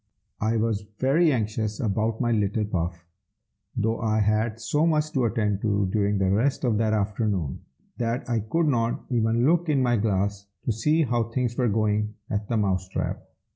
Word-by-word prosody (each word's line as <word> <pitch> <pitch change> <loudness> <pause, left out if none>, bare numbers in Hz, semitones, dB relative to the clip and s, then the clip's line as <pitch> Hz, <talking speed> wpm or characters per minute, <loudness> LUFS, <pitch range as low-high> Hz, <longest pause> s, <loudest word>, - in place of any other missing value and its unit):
I 110 +1 +1
was 110 -2 -1
very 150 +5 +3
anxious 110 -3 -1
about 110 0 0
my 120 -2 +1
little 105 0 +1
Puff, 85 -3 -3 0.7
though 110 +2 0
I 110 -1 +1
had 110 +2 +1
so 150 +7 +1
much 155 -1 +1
to 130 -5 +1
attend 105 -3 0
to 100 -2 +1
during 105 -1 +1
the 95 -1 +1
rest 120 +8 +1
of 115 -4 +1
that 110 -1 +2
afternoon, 100 - -1 0.4
that 120 +1 -1
I 120 -2 +1
could 160 +11 0
not 120 -5 0
even 115 0 +2
look 170 +2 +2
in 140 -3 +3
my 120 -1 +2
glass 100 -1 -1 0.2
to - - +1
see 150 +9 +2
how 120 -3 0
things 120 +1 -2
were 125 -2 +1
going 105 0 0 0.2
at 105 -1 -2
the 115 - 0
Mouse 95 -3 0
trap. - - -3
110 Hz, 180 wpm, -25 LUFS, 105-120 Hz, 0.7 s, very